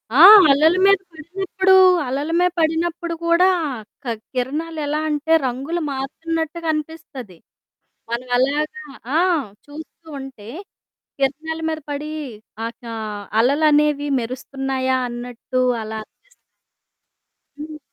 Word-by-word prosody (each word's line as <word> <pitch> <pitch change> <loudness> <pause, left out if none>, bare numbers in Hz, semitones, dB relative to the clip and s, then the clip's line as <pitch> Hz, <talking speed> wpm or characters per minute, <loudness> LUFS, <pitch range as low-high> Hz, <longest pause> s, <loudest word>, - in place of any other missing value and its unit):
ఆ! - - +3 0.3
అలల 310 +5 +4
మీద 395 0 +6 0.2
పడినప్పుడూ, 380 +4 -2 0.4
అలల 280 +5 -2
మీ 360 - +4
పడినప్పుడు 335 +1 -1
కూడా 340 +2 +4 0.6
క్ - - -10 0.3
కిరణాలెలా 300 +3 -2
అంటే, 300 +2 -2
రంగులు 275 +8 -3
మారుతున్నట్టుగనిపిస్తది. 310 - -4 0.7
మనమెలాగ 255 +5 0 0.5
ఆ! - - +4 0.5
చూస్తూ 315 +2 -12
ఉంటే 255 -6 -10 0.7
కిరణాల 310 +4 -2
మీద 315 0 -3
పడీ 295 +1 -4 0.5
ఆహ్, 230 +1 -4
కా 230 -1 -7 0.5
అలలనేవి 290 +3 +3
మెరుస్తున్నాయా 260 +2 -2
అన్నట్టు 245 +1 -4 0.2
అలా 220 0 -6
అనిపిస్తుంది. - - -31 1.3
హ్మ్. 305 0 -7
295 Hz, 95 wpm, -20 LUFS, 260-320 Hz, 1.3 s, మీద